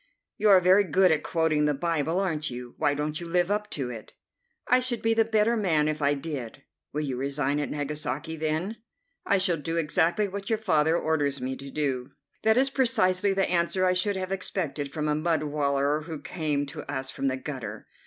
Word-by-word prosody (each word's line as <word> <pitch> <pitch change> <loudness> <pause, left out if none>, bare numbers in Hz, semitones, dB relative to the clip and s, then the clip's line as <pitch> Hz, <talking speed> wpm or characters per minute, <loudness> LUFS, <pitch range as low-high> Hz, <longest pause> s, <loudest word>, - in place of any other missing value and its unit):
"You 215 - +4
are 195 -2 +8
very 185 +3 +5
good 185 0 +4
at 155 - +2
quoting 160 -3 +1
the 150 -1 +2
Bible, 165 +2 0
aren't 160 -6 -1
you? 125 -1 -7
Why 145 - +2
don't 150 +3 -2
you 170 - -6
live 175 +2 +1
up 210 0 -1
to 130 -4 -4
it?" 115 -3 -10 0.5
"I 250 - +5
should 250 -2 -2
be 225 0 +3
the 225 0 +4
better 220 +1 +2
man 165 -9 +2
if 155 0 -2
I 145 0 +3
did." 135 -4 -6 0.3
"Will 150 - -2
you 135 -4 -3
resign 140 +1 -1
at 145 - -2
Nagasaki, 150 +2 -3
then?" 160 +7 -2 0.5
"I 200 - +4
shall 185 -3 +1
do 165 +2 -3
exactly 165 +5 +2
what 195 0 -6
your 225 - +2
father 160 -6 +2
orders 145 -4 0
me 130 +1 -3
to 140 +1 -9
do." 135 -3 -2 0.3
"That 220 +1 +3
is 270 +1 +3
precisely 210 -7 +2
the 195 0 +1
answer 175 +2 +1
I 185 - +3
should 195 +2 0
have 185 0 -4
expected 160 -7 -3
from 155 0 -2
a 150 - +2
mud 155 +1 0
wallower 145 0 0
who 160 -1 -6
came 150 -4 -2
to 145 +2 -7
us 135 -1 -3
from 135 - -2
the 130 0 0
gutter." 130 -3 -6
160 Hz, 210 wpm, -27 LUFS, 145-185 Hz, 0.5 s, are